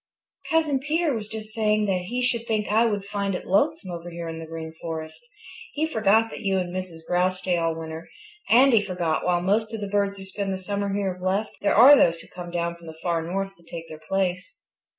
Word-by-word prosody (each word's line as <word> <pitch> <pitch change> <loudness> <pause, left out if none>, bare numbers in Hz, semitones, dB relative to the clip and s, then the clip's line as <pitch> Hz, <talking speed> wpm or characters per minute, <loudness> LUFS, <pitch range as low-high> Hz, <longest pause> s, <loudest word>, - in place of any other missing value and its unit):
"Cousin 315 -4 +2
Peter 305 +2 0
was 215 -3 -4
just 215 0 -7
saying 215 -1 +2
that 185 -3 0
he 250 +4 -1
should 235 -2 0
think 215 -2 0
I 225 +2 +4
would 205 -3 -2
find 200 -1 -2
it - - -5
lonesome 215 - +1
over 170 0 -6
here 170 0 -6
in 165 0 -5
the 165 - -7
Green 160 0 -7
Forest. 160 - -6 0.5
He 305 +2 0
forgot 225 -5 +3
that - - -7
you 195 -2 +1
and 180 -1 -2
Mrs. 175 -3 -6
Grouse 180 +1 +2
stay 185 -1 0
all 165 -1 0
winter, 160 0 -7 0.4
and 255 +3 +6
he 220 - +6
forgot 180 -5 -1
that - - -4
while 175 -1 +2
most 220 +4 +1
of - - -5
the 205 - -3
birds 200 0 0
who 195 - -8
spent 195 +1 -4
the 190 - -1
summer 200 +1 -2
here 195 -1 -1
have 180 - -15
left, 195 +4 0
there 200 - +2
are 270 - +9
others 170 -12 +6
who - - -13
come 175 -1 -8
down 170 0 -2
from 170 -1 -14
the 160 0 -9
Far 170 -2 +1
North 195 +4 -3
to 170 - -22
take 165 0 -8
their 155 0 -10
place." 185 -1 -1
195 Hz, 240 wpm, -25 LUFS, 175-215 Hz, 0.5 s, are